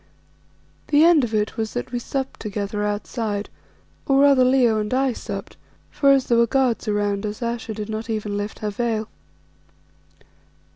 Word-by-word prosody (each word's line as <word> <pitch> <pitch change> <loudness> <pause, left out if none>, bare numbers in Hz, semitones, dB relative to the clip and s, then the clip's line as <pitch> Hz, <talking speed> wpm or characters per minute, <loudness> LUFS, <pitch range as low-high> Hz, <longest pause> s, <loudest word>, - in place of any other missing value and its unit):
The 295 +1 +5
end 330 -4 +6
of 235 - -2
it 215 -1 -1
was 220 -1 -2
that 245 0 -4
we 245 - -2
supped 265 +2 -4
together 205 0 -3
outside, 210 0 -3 0.6
or 275 0 +4
rather 280 -2 +6
Leo 250 -4 +3
and 210 0 -3
I 260 0 +1
supped, 200 -3 -7 0.3
for 280 - +2
as 270 -2 +5
there 235 -1 +3
were 235 - +4
guards 250 -2 +1
around 205 -1 0
us 210 +2 -4
Ayesha 235 -2 -3
did 210 -1 -5
not 220 +1 -5
even 210 -2 -2
lift 205 +1 -4
her 210 - -1
veil. 220 0 -2
225 Hz, 165 wpm, -22 LUFS, 210-255 Hz, 0.6 s, end